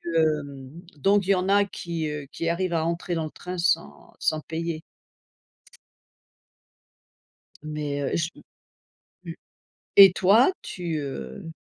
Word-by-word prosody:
hem, 145 -4 0 0.3
donc 195 +6 +3
il - - -4
y - - +5
en 185 +1 -1
a 200 0 +4
qui, 170 -4 -4
heu, 150 -1 -5
qui 165 - -2
arrivent 175 +1 -1
à 160 -1 +1
entrer 170 +1 -2
dans 165 - -1
le 155 - -7
train 180 0 -7
sans 170 -1 -1
sans 155 - 0
payer. 160 0 -4 2.8
Mais 150 -2 -4
heu, 140 - -1
j 170 0 0 1.0
mmh, - - -5 0.7
et 195 -2 +10
toi, 200 - +5
tu, 170 -3 -4
heu, 135 - -6
165 Hz, 135 wpm, -25 LUFS, 150-180 Hz, 2.8 s, et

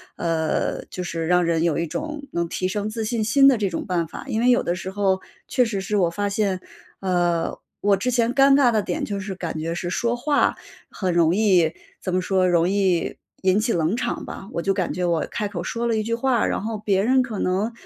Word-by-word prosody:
呃， 165 -2 -1
就 180 - -6
是 165 -2 -3
让 180 0 +4
人 165 -1 +1
有 165 -2 +1
一 170 - 0
种 300 - -5
能 170 0 -1
提 185 +2 -2
升 205 +2 -2
自 220 +1 -3
信 225 +1 -1
心 275 +6 +5
的 260 - +3
这 205 -3 0
种 170 - -4
办 175 -3 -1
法。 - - -8
因 220 -3 0
为 245 +2 +3
有 245 - +4
的 175 - -1
时 185 +1 -5
候 190 -1 +1 0.3
确 250 - +3
实 205 -4 -2
是 210 +2 -1
我 180 -4 +3
发 205 +4 -2
现 200 -2 0 0.4
呃， 175 -3 0 0.2
我 200 -1 +3
之 250 +6 -1
前 240 0 +1
尴 275 +1 +6
尬 275 -3 +5
的 215 -2 +2
点 - - -3
就 200 -1 -3
是 195 -1 -5
感 170 -3 -4
觉 165 +2 -3
是 175 0 -3
说 235 +6 0
话 285 +4 +1 0.3
很 185 -3 -2
容 170 0 +3
易 185 -6 +3 0.3
怎 185 -1 -2
么 185 - +2
说 185 0 +2
容 170 0 +3
易 190 -3 +1 0.3
引 190 +2 +4
起 225 +2 0
冷 170 +2 +1
场 250 - -3
吧， 195 - -8
我 170 - -2
就 195 - +2
感 185 -3 -1
觉 180 - -1
我 170 -2 +1
开 210 -3 -2
口 185 -4 -5
说 230 +6 -3
了 230 -1 +1
一 215 - +1
句 230 +2 -1
话， 245 0 +1
然 - - -1
后 220 0 -3
别 200 -2 +1
人 260 +4 +4
可 235 -5 -4
能， 190 +6 0
195 Hz, 260 characters per minute, -23 LUFS, 175-225 Hz, 0.4 s, 尴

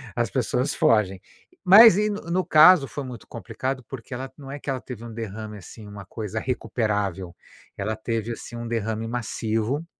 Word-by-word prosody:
As 120 -3 0
pessoas 125 +4 -1
fogem. 100 -4 +2 0.4
Mas 205 +2 +9
e 210 +1 +1
no 205 0 -4
no 185 +2 +1
caso 155 -1 +7
foi 145 - -6
muito 125 -4 -9
complicado 130 0 -5
porque 135 0 -9
ela, 130 +1 -6
não 140 -2 -11
é 145 - -6
que 145 - -7
ela 130 -2 -2
teve 120 -3 -9
um 115 - -8
derrame 110 -1 -6
assim, 105 +3 -12
uma 100 -1 -10
coisa 110 +1 -5
recuperável, 105 -7 -2 0.4
ela 105 +2 -2
teve 115 +1 -3
assim 115 - -8
um 120 0 -5
derrame 110 -1 -2
massivo 115 +4 -2
115 Hz, 180 wpm, -24 LUFS, 110-135 Hz, 0.4 s, Mas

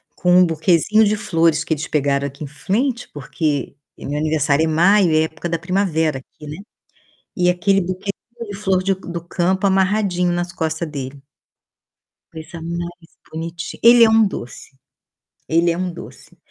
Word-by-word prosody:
com 180 0 +4
buquezinho 170 +6 +3
de 210 +1 +2
flores 165 -5 +1
que 160 - -1
eles 155 +1 -4
pegaram 140 -1 0
aqui 140 +2 -9
em - - -5
frente, 235 - -2
porque 145 -1 -3 0.2
meu 145 +1 -4
aniversário 155 -1 +1
é - - -1
maio, 175 +3 +4
é 155 0 +3
época 160 +2 -5
da 165 0 -1
primavera 160 -5 0
aqui 150 +3 -15
não 150 - -6
é? - - -11 0.8
E 180 -1 +2
aquele 195 +2 +2
de 200 +4 -6
flor 190 -2 0
de 195 +1 +1
do 175 -2 -7
campo 185 +3 0
amarradinho 190 -2 +1
nas 175 0 -2
costa 160 -1 -2
dele. 140 -2 -7 1.1
Coisa 160 +1 -9
mais 170 0 -6 0.2
bonitinha, 165 +1 -6
ele 235 0 +8
é 220 - +4
um 220 -1 +5
doce. 125 -10 -7 0.8
Ele 170 +2 +2
é 165 - -3
um 180 0 -2
doce. 170 - -12
170 Hz, 160 wpm, -20 LUFS, 155-190 Hz, 1.1 s, ele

